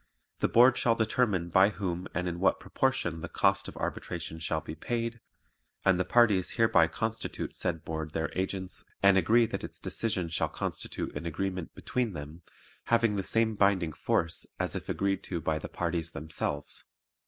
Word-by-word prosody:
The - - +3
Board 125 +3 +6
shall 115 -1 +3
determine 110 -6 +1
by 95 +3 +6
whom 95 -3 -3
and 90 +2 0
in 85 0 -3
what 95 - +3
proportion 90 -11 0
the - - -5
cost - - +2
of - - -9
arbitration 85 -2 -4
shall 80 -1 -1
be 80 0 -7
paid, 115 +5 -3 0.7
and 95 -1 +4
the - - +3
parties 105 -5 +4
hereby 110 -8 +5
constitute 110 +5 -3
said 80 -1 -2
Board 80 -1 -4
their 80 -2 -1
agents 95 0 -3 0.2
and 100 -1 +7
agree 115 +5 +5
that - - -4
its - - -7
decision 95 -6 -1
shall 80 - 0
constitute - - -4
an 80 +3 -4
agreement 90 +1 -3
between 120 -5 -1
them, 75 +2 -8 0.4
having 115 -2 +3
the 100 - 0
same 115 +2 +2
binding 100 -6 +2
force 85 +4 0
as - - -1
if - - -5
agreed 100 -1 0
to 85 - -3
by 80 -1 -1
the - - -7
parties 85 -1 -2
themselves. 75 -1 -3
95 Hz, 175 wpm, -30 LUFS, 80-110 Hz, 0.7 s, and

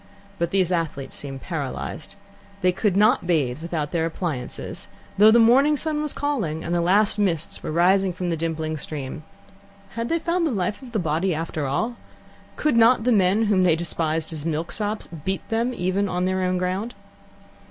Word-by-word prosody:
But 170 0 0
these 185 -1 +1
athletes 160 -6 -2
seemed 135 -2 -6
paralysed. 145 -7 -5 0.5
They 180 - +4
could 195 +1 0
not 215 -2 +4
bathe 150 -5 +1
without 160 -3 -3
their 165 -2 0
appliances, 160 -7 -5 0.3
though 210 +1 +9
the 225 - +6
morning 265 +6 +5
sun 305 0 -1
was 300 -2 -2
calling 215 - -2
and 170 - -3
the 175 - +2
last 200 +4 +3
mists 170 -6 0
were - - -4
rising 185 +3 +3
from 180 0 -3
the - - +1
dimpling 160 -1 -2
stream. 140 -1 -5 0.7
Had 230 +1 -4
they 335 - +2
found 340 0 0
the - - -1
life 200 0 -2
of 250 -2 -12
the - - +1
body 170 0 0
after 155 -2 -3
all? 225 - -1 0.6
Could 300 -6 +1
not 230 0 +5
the 250 - +2
men 200 0 +3
whom 200 -3 +3
they 175 -3 +4
despised 160 -1 -1
as 150 -2 -5
milksops 175 +7 -2 0.2
beat 190 +2 -3
them, 230 +2 0
even 190 -1 -1
on 180 0 -1
their 185 0 0
own 185 0 +1
ground? 185 +6 -2
180 Hz, 185 wpm, -23 LUFS, 160-220 Hz, 0.7 s, though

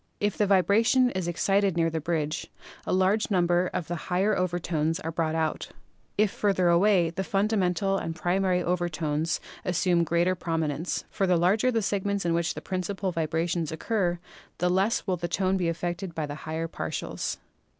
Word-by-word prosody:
If 205 0 0
the 210 - +1
vibration 225 +6 +4
is 185 -2 -3
ex 175 - -2
cited 195 -2 +2
near 165 -1 +2
the 160 0 -2
bridge, 155 -1 -2 0.4
a - - 0
large 190 +4 +2
number 175 -2 +2
of 180 -4 -3
the 175 - -3
higher 195 +4 +2
over 180 -1 0
tones 165 -2 -1
are 165 - -3
brought 160 -1 -1
out; 160 -1 -1 0.5
if 210 -1 +3
farther 190 -4 +1
away 175 -1 +4
the 190 +3 -3
fundamental 195 -1 +1
and 165 - -4
primary 180 +1 +1
overtones 165 -3 -1 0.2
assume 175 -1 +2
greater 170 +2 +2
prominence, 165 -2 -2
for 195 - 0
the 180 -1 +4
larger 200 +9 +3
the 225 -3 0
segments 200 -1 -1
in 170 - +2
which 170 0 0
the - - -6
principal 190 +1 -3
vibrations 165 0 -1
oc 160 - -6
cur 185 -6 0 0.4
the 180 +1 +1
less 195 +5 +1
will 185 -3 0
the 170 - -3
tone 190 +1 +1
be 180 -3 0
affected 175 +1 -4
by 155 - -1
the 145 - -6 0.2
higher 160 +1 -2
partials. - - -4
180 Hz, 180 wpm, -27 LUFS, 165-195 Hz, 0.5 s, vibration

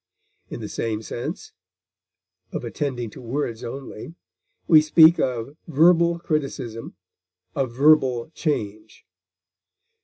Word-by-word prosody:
In - - -7
the - - -5
same 110 -1 -3
sense, 120 - -6 1.0
of - - -5
attending 125 -6 -4
to - - -12
words 120 -2 -4
only, 135 +4 -8 0.5
we 155 -2 +7
speak 160 +2 +6
of 125 +2 -2
verbal 170 +2 +4
criticism, 135 -8 -4 0.6
a 135 -2 0
verbal 130 0 +3
change. 110 -9 -4
135 Hz, 100 wpm, -23 LUFS, 115-155 Hz, 1.0 s, we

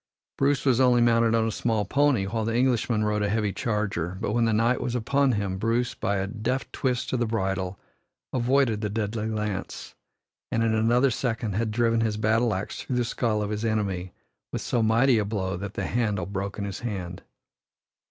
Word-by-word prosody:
Bruce 140 0 +1
was 130 -3 +3
only 125 -2 +5
mounted 115 -1 +4
on 115 0 +2
a - - -1
small 110 -1 0
pony, 140 -2 +2
while 110 +3 -2
the 115 +1 -1
Englishman 120 -3 +2
rode 105 0 0
a 105 - +1
heavy 105 -2 0
charger 100 -6 -2
but 105 -1 -2
when 120 +1 +2
the 115 - +2
knight 115 +3 +2
was 125 - -2
upon 135 +3 +2
him, 100 -3 -2
Bruce, 115 +3 0
by 100 - -1
a 95 0 0
deft 115 +6 -3
twist 125 -2 -1
of 130 - +1
the 120 - +1
bridle, 95 -3 -2 0.5
avoided 125 -3 +2
the 105 - -1
deadly 110 +1 -2
lance, 105 -3 -4 0.6
and 115 - +1
in 115 -1 +2
another 120 +4 +3
second 115 -3 -2
had 110 +3 0
driven 115 +1 +2
his 110 -2 0
battle 110 +2 +2
axe 95 - -4
through 130 - -3
the 120 -1 +1
skull 110 -2 0
of 105 - -3
his 105 +1 -3
enemy 100 -5 -1 0.4
with - - -3
so 120 - 0
mighty 115 +2 +4
a - - +1
blow 100 -2 -2
that 100 +2 -6
the - - -2
handle 105 -6 0
broke 100 +1 -4
in 100 - -3
his 100 -2 -5
hand. 95 -6 -5
110 Hz, 200 wpm, -26 LUFS, 105-120 Hz, 0.6 s, only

